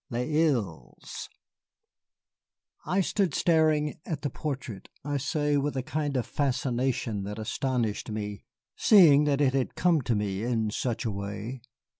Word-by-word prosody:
LES 125 +6 -2
ILES 100 - -5 1.6
I 185 +4 +2
stood 190 -3 0
staring 155 -3 +2
at 150 -4 -5
the 145 - -1
portrait, 130 -10 -5 0.2
I 145 -1 -1
say, 145 +1 0
with 140 0 -1
a 130 - -1
kind 145 -1 -2
of 120 - -1
fascination 125 -5 -1
that 105 +1 -5
astonished 115 -1 -2
me, 105 -2 -5 0.3
seeing 155 -8 +6
that 145 -1 +1
it 135 -2 +3
had 135 -2 -1
come 170 -4 +3
to 120 -2 0
me 100 -1 -2
in 110 -2 0
such 120 +1 -2
a 110 - 0
way. 105 +5 -5
130 Hz, 145 wpm, -28 LUFS, 110-150 Hz, 1.6 s, seeing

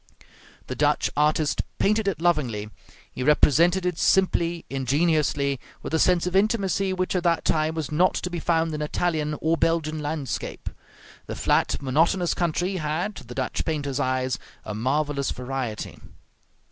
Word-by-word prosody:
The - - -5
Dutch - - +1
artist 150 0 +2 0.2
painted 215 +1 +2
it 195 -5 0
lovingly; 125 -12 0 0.4
he - - -7
represented 165 +6 +4
it 180 -2 -1
simply, 175 -3 +2
ingenuously, 140 0 +1 0.2
with - - -6
a 160 - +3
sense 180 0 +3
of 180 +1 -2
intimacy 195 -2 +2
which 185 0 -1
at 180 - +2
that 170 -2 +1
time 155 0 +1
was 155 -4 -3
not 175 +5 +3
to 180 - -3
be 175 - -3
found 165 -1 +1
in 150 - -3
Italian 150 -1 -1
or 160 +1 +2
Belgian 160 -2 0
landscape. 150 -3 -4 0.6
The - - -5
flat, - - +1
monotonous 165 +6 +2
country 180 +3 -1
had, 165 +6 -2
to - - -9
the 125 - -8
Dutch 130 -1 -2
painter's 145 -4 -2
eyes, 130 -1 0 0.3
a 105 - -4
marvelous 140 +5 0
variety. 125 -4 -4
155 Hz, 155 wpm, -25 LUFS, 140-175 Hz, 0.6 s, represented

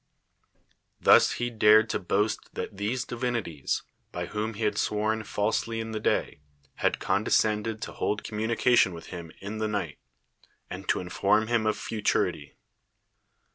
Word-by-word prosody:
Thus - - +6
he 120 0 -2
dared 110 0 +6
to - - -1
boast 105 +4 -1
that - - -5
these 115 +5 -1
divinities, 115 - -2 0.3
by 90 0 -4
whom 105 +4 -3
he 110 - -4
had 105 - +1
sworn 110 +1 0
falsely 110 +2 -1
in 115 0 -4
the 110 - -3
day, 75 - 0 0.4
had - - +1
condescended 110 0 +1
to - - -5
hold 105 0 -2
communication 110 -2 +2
with 85 - -10
him 85 -2 -7
in 105 +3 -5
the 110 - 0
night, 105 -2 -3 0.7
and 95 +1 -7
to - - +2
inform 100 +4 +1
him 115 -2 +1
of 110 - +1
futurity. 110 -2 -1
105 Hz, 145 wpm, -27 LUFS, 100-110 Hz, 0.7 s, Thus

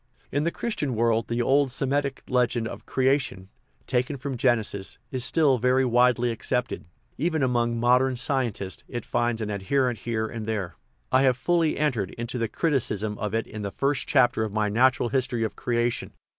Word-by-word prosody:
In 145 +2 0
the - - +3
Christian 170 - -3
world 115 0 +1
the 120 +1 0
old 140 +2 +3
Semitic 140 +1 -1
legend 125 -2 +1
of - - -9
crea 135 +2 +3
tion, 95 -8 -8 0.4
taken 130 +2 -1
from 135 +1 -4
Genesis, 115 -5 0
is 130 -2 -2
still 145 -5 +3
very 130 +2 +3
widely 125 0 +3
accepted; 120 +2 -2 0.3
even 160 -1 +1
among 120 -2 +1
modern 125 +2 +3
scientists 120 -7 -2
it 120 -3 -5
finds 120 -1 0
an 105 - -3
adherent 120 +4 0
here 110 -1 -2
and 110 -1 -6
there. 105 -6 -2 0.4
I 130 - +5
have 130 -2 +3
fully 165 +3 +1
entered 125 -11 0
into 120 +1 -3
the 115 - 0
criticism 110 - -1
of 105 0 -2
it 115 - 0
in 110 - -8
the 100 - -3
first 135 +5 -1
chapter 125 -5 +3
of 110 - -3
my 105 0 0
Natural 125 +2 +3
History 125 -3 0
of 110 - -3
Crea 120 0 0
tion. - - -7
125 Hz, 185 wpm, -26 LUFS, 115-135 Hz, 0.4 s, I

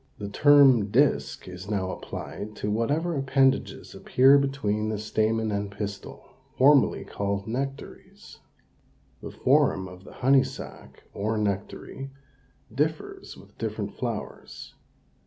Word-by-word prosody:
The 100 - -6
term 135 -3 +5
disk 105 - +1
is 90 +1 -9
now 95 -3 -1
applied 105 +1 -7
to 105 - -3
whatever 150 +10 0
appendages 135 -1 0
appear 135 +2 +4
between 110 -6 -1
the 110 - -2
stamen 110 +1 0
and 100 0 -2
pistil, 100 0 -7 0.3
formerly 140 +1 +4
called 100 0 -3
nectaries. 135 +5 -7 0.8
The - - -7
form 95 0 +2
of 90 0 -13
the - - -13
honey 135 +1 +4
sac, - - -10
or 110 +2 -2
nectary, 105 +6 -4 0.6
differs 160 - -3
with - - -17
different - - -4
flowers. - - -6
110 Hz, 120 wpm, -26 LUFS, 100-135 Hz, 0.8 s, term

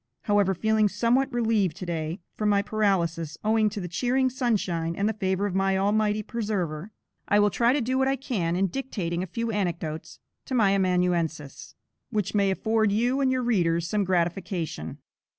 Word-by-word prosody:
However, 205 -2 +2
feeling 220 +2 +2
somewhat 240 +7 +1
relieved 225 -7 +1
to 185 - -6
day, 165 +1 -3
from 210 -1 0
my 200 -1 +3
paralysis, 175 -7 0
owing 215 0 +3
to 210 0 -6
the 180 - -4
cheering 255 +8 +1
sunshine 190 -10 -1
and 200 +3 0
the 220 - 0
favor 190 -1 -1
of 200 - -2
my 195 0 +1
Almighty 210 +2 +1
Preserver, 200 -6 -3 0.4
I 205 - +4
will 205 0 +3
try 235 +4 +3
to 285 +1 +1
do 255 +3 0
what 265 - +2
I 270 - +2
can, 210 -11 -2
in 190 +2 +2
dictating 185 -6 -3
a 185 - -4
few 230 +5 -3
anecdotes 170 -6 -3 0.3
to 260 - -3
my 210 -5 +4
amanuensis, 180 -6 -1 0.3
which 210 -5 -2
may 200 -2 +3
afford 220 +2 +1
you 245 +6 +1
and 265 -1 +2
your 255 -1 0
readers 170 -8 +1
some 210 +2 0
gratification. 175 - -2
200 Hz, 180 wpm, -26 LUFS, 175-225 Hz, 0.4 s, I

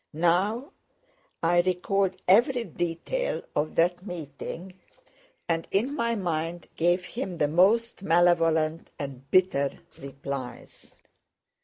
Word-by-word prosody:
Now 185 - +1 0.7
I 175 +1 +4
recalled 185 +1 0
every 240 +6 +4
detail 175 - -2
of 150 +1 -1
that 175 +2 +2
meeting 175 +1 -7 0.7
and 165 -1 -1
in 235 +8 0
my 235 -5 0
mind 170 -3 -2
gave 175 +2 +2
him 190 -3 -5
the 150 - +2
most 200 +9 +3
malevolent 165 -3 +2
and 135 -1 -7
bitter 160 -7 +2 0.2
replies. 140 -2 -8
175 Hz, 105 wpm, -27 LUFS, 160-195 Hz, 0.7 s, I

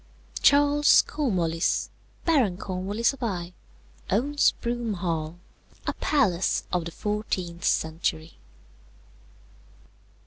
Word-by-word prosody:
"Charles 290 +1 +5
Cornwallis, 175 - -1 0.3
Baron 255 - +2
Cornwallis 200 +6 -1
of 270 - -13
Eye, 180 -6 -3 0.6
owns 285 +9 +2
Broome 235 -2 -2
Hall, 165 -2 -3 0.5
a - - -1
palace 195 - +1
of 175 -2 0
the 170 - -5
fourteenth 185 -4 -3
century. 160 0 -1
195 Hz, 90 wpm, -26 LUFS, 170-245 Hz, 0.6 s, Charles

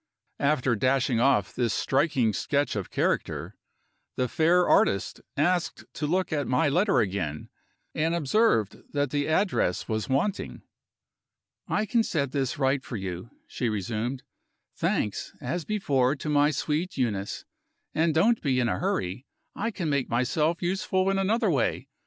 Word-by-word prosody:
After 135 -4 +2
dashing 130 +1 +1
off 120 -6 +2
this 120 -4 0
striking 135 -5 +1
sketch 145 +5 0
of 100 -4 -3
character, - - -1 0.6
the 125 - 0
fair 170 +7 +3
artist 95 - +2 0.2
asked 175 +4 0
to 150 - -3
look 180 +2 0
at 145 -2 -1
my 130 +4 +2
letter 190 +8 +3
again, 90 -7 -3 0.4
and 160 +2 0
observed 155 - +2 0.2
that 145 -2 0
the 145 -1 0
address 160 - +1
was 110 +2 -2
wanting. 165 +10 -1 1.0
"I 215 - 0
can 230 +3 +2
set 140 - -1
this 135 0 -1
right 135 -1 +1
for 120 - -5
you," 95 +1 -5 0.2
she 120 - -2
resumed, 110 +5 -3 0.5
"thanks, 105 - -1
as 160 +7 -3
before, 140 -11 +1
to 150 - -5
my 145 0 +4
sweet 155 +3 -2
Euneece. 105 -6 -2 0.5
And 160 +1 +2
(don't 225 +8 +3
be 130 -4 +1
in 120 - +2
a 90 -4 -1
hurry) 95 +8 -2 0.3
I 230 - -1
can 190 -7 -4
make 140 -3 0
myself 150 +8 0
useful 190 +1 +1
in 195 - 0
another 210 +1 +2
way. 135 -6 0
140 Hz, 150 wpm, -27 LUFS, 120-170 Hz, 1.0 s, my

